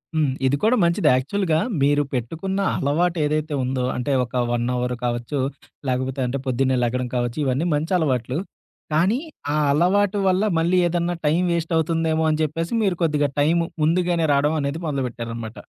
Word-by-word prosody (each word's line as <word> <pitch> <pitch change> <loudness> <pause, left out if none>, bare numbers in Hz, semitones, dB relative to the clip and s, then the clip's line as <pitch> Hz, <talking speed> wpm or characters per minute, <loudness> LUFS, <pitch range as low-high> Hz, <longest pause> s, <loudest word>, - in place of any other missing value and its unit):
హ్మ్. 150 -4 +2
ఇది 135 - +2
కూడా 225 +4 +4
మంచిది. 170 -2 +2
యాక్చువల్‌గా 160 +5 0 0.2
మీరు 145 +1 +3
పెట్టుకున్న 165 +11 -3 0.2
అలవాటేదైతే 155 0 0
ఉందో 130 0 -1
అంటే, 125 +3 -2
ఒక 125 +1 -2
1 120 0 0
అవర్ 125 0 -1
కావచ్చు, 120 +4 -2 0.5
లేకపోతే 130 +1 -2
అంటే 135 +3 -2
పొద్దున్నే 130 +1 +1
లెగడం 125 +1 -1
కావచ్చు, 120 -1 -1
ఇవన్నీ 135 +5 0
మంచలవాట్లు. 145 -5 0 0.5
కానీ, 185 +10 +2 0.3
ఆ - - +1 0.2
అలవాటు 190 +6 +2
వల్ల 185 +2 +2 0.2
మళ్ళీ 170 +3 +2
ఏదన్నా 175 0 -1
టైం 155 +3 +3
వేస్ట్ 170 0 -1
అవుతుందేమో 160 0 +1
అని 155 0 0
చెప్పేసి 165 +5 -2
మీరు 190 -4 +1
కొద్దిగా 150 -3 +1
టైము 165 +3 +3 0.2
ముందుగానే 170 0 +2
రావడం 145 +3 +2
అనేది 140 +3 -2
మొదలుపెట్టారనమాట. 115 -5 -4
150 Hz, 150 wpm, -22 LUFS, 130-170 Hz, 0.5 s, కూడా